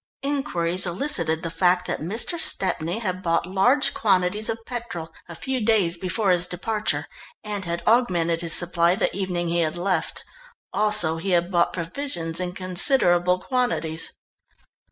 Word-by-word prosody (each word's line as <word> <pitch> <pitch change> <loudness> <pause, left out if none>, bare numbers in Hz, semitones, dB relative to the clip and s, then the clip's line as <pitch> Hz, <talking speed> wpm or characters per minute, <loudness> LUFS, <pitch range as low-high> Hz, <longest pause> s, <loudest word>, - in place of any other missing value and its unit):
Inquiries 185 - 0
elicited 170 - 0
the 165 - -4
fact 180 +2 +2
that - - -3
Mr. 225 - -2
Stepney 175 - 0
had 185 -5 -3
bought 165 -1 0
large 220 +10 +2
quantities 200 0 +1
of 225 0 -4
petrol 230 -10 -6 0.2
a 170 - -8
few 260 +5 -3
days 205 -6 +3
before 185 +3 0
his 180 0 +3
departure, 210 +5 -2 0.4
and 205 -3 -4
had 170 0 -4
augmented 175 -8 +2
his 170 -1 +2
supply 175 0 +4
the - - -1
evening 180 -3 -2
he 170 +1 0
had 160 0 -1
left. 175 -2 -1 0.5
Also 210 -7 +3
he 170 +4 -4
had 175 +2 -2
bought 170 -1 +2
provisions 170 - -3
in 180 -1 -3
considerable 180 -1 +2
quantities. 210 -11 -1
180 Hz, 150 wpm, -23 LUFS, 170-215 Hz, 0.5 s, supply